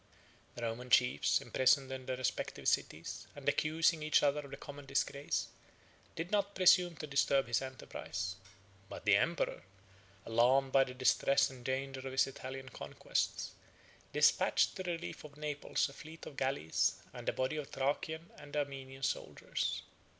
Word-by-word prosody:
The 120 - -6
Roman 115 +2 -3
chiefs, 125 -12 +4
imprisoned 130 +1 +3
in 130 -1 -6
their 130 - -1
respective 130 - -2
cities, - - -1
and - - -9
accusing 160 +1 +2
each 155 0 +3
other 145 0 +3
of 140 -1 -8
the - - -7
common 145 -1 -10
disgrace, 140 +1 -1 0.7
did 165 +3 -4
not 200 -1 +1
presume 180 -2 +5
to 155 - -6
disturb 140 -1 +2
his 120 0 +1
enterprise. 95 -7 -5 0.5
But - - -8
the - - +6
emperor, - - +1 0.6
alarmed 130 +4 +3
by 135 0 +5
the 125 - -8
distress 130 +2 +3
and 125 -2 -12
danger 135 +1 -2
of 130 0 -6
his 130 - +4
Italian 130 0 -7
conquests, - - -2 0.6
despatched - - +4
to - - -4
the 180 -2 -2
relief 170 +1 -6
of 145 -1 -12
Naples 150 -1 -1
a 140 - -11
fleet 160 +3 -11
of 145 - -9
galleys 130 - +1 0.2
and - - -3
a - - +2
body 130 +4 -1
of 150 -2 -4
Thracian 160 +4 -2
and 145 0 -7
Armenian 135 -2 -4
soldiers. - - -2
135 Hz, 160 wpm, -34 LUFS, 130-150 Hz, 0.7 s, the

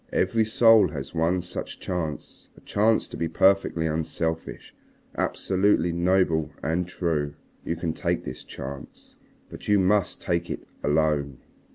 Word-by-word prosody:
Every 110 +4 +2
soul 115 0 +6
has 70 -3 -7
one 85 +2 +1
such 90 0 -6
chance, 80 -5 -5
a - - -16
chance 110 +2 +2
to - - -9
be 80 +1 -1
perfectly 95 -1 +2
unselfish, 80 +1 -3 0.4
absolutely 95 -2 +1
noble 85 -3 +2
and 85 +4 0
true. 75 -5 -2 0.3
You 85 - -2
can 80 -1 -2
take - - -1
this 65 - -7
chance. 70 +1 -9 0.4
But - - -10
you 105 - +4
must 100 0 +2
take 85 -1 -1
it - - -6 0.2
alone. 75 -3 +1
85 Hz, 140 wpm, -25 LUFS, 80-95 Hz, 0.4 s, soul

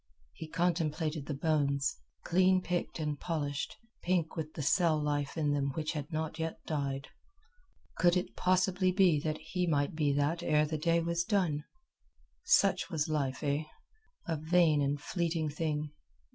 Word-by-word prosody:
He 160 - -8
contemplated 160 -3 -1
the 145 - -2
bones, 140 -2 +1 0.3
clean 185 +1 +4
picked 175 -1 -2
and 150 -3 -2
polished, 145 -4 -3 0.2
pink 175 -3 0
with 155 -1 -4
the 150 - -3
cell 165 +1 +3
life 145 0 -1
in 150 -2 +1
them 140 -1 0
which 155 -1 -2
had 150 0 -5
not 160 0 -3
yet 160 0 -2
died. 140 -3 -3 0.9
Could 175 0 +5
it 180 - -3
possibly 185 0 +2
be 180 -5 +4
that 155 +1 -2
he 180 -1 -2
might 145 -3 +1
be 150 -2 +1
that 145 +4 0
ere 150 -3 +3
the 155 0 -3
day 170 +2 +2
was 170 +1 0
done! 175 -7 0 0.8
Such 195 - +3
was 160 -3 -1
life, 140 -3 -1
eh? 145 +1 0 0.6
A 165 -2 -1
vain 160 -1 +3
and 140 +1 0
fleeting 165 0 -1
thing. 150 -1 -2
155 Hz, 160 wpm, -32 LUFS, 145-175 Hz, 0.9 s, Could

